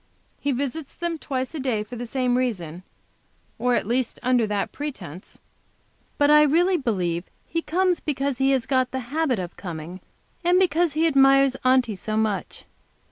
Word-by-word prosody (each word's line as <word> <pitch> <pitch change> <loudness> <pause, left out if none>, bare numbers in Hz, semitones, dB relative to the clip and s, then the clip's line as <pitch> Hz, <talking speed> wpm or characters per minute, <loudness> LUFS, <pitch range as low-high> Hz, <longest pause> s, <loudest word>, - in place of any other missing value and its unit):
He 285 - -1
visits 275 +3 -4
them 340 -2 -3
twice 260 -1 -3
a 315 - -4
day 245 -6 -1
for 230 +4 -9
the 240 0 -5
same 250 0 0
reason, 185 -10 -2 0.8
or 245 +1 +2
at - - 0
least 245 +2 -1
under 245 -3 +2
that 205 -1 -2
pretense, 195 - -7 0.8
but 290 0 +4
I 300 0 +8
really 340 +6 +3
believe 185 - -1 0.2
he 330 - -2
comes 360 +2 +1
because 280 -3 -2
he 270 0 +3
has 265 -2 +2
got 255 -2 +1
the 260 0 -6
habit 310 -6 +1
of 180 -2 -5
coming, 175 0 -7 0.4
and 350 +1 +4
because 345 -3 +2
he 315 +2 +2
admires 275 -3 +5
Aunty 255 -3 +3
so 215 +2 -3
much. 215 -2 -2
260 Hz, 170 wpm, -24 LUFS, 220-295 Hz, 0.8 s, I